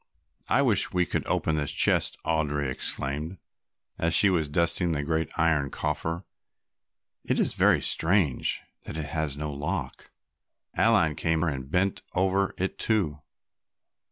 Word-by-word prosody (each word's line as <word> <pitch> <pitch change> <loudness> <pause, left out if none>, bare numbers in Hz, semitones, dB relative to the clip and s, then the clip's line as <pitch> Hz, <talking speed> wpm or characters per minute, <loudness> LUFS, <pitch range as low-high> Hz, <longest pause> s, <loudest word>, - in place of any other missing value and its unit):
"I - - +3
wish - - +2
we 90 -1 +2
could - - -3
open 80 -1 0
this 75 -2 0
chest," - - +2
Audry 75 -4 0
exclaimed, 75 +7 -3 0.6
as 85 0 +2
she 100 - +6
was 80 -5 0
dusting 85 +2 +1
the 70 -2 -2
great 80 +2 -1
iron 80 -4 +2
coffer. 80 +5 -3 1.0
"It - - 0
is - - +3
very - - +4
strange 85 -5 +1 0.2
that - - -6
it 80 - -3
has 75 -2 -2
no 75 0 -4
lock." 70 +2 -4 0.7
Aline 80 -2 +3
came 80 0 +1
and 70 -5 -3
bent 95 +4 0
over 95 +1 +1
it 95 +1 -3
too. 85 -10 0
80 Hz, 140 wpm, -27 LUFS, 75-85 Hz, 1.0 s, she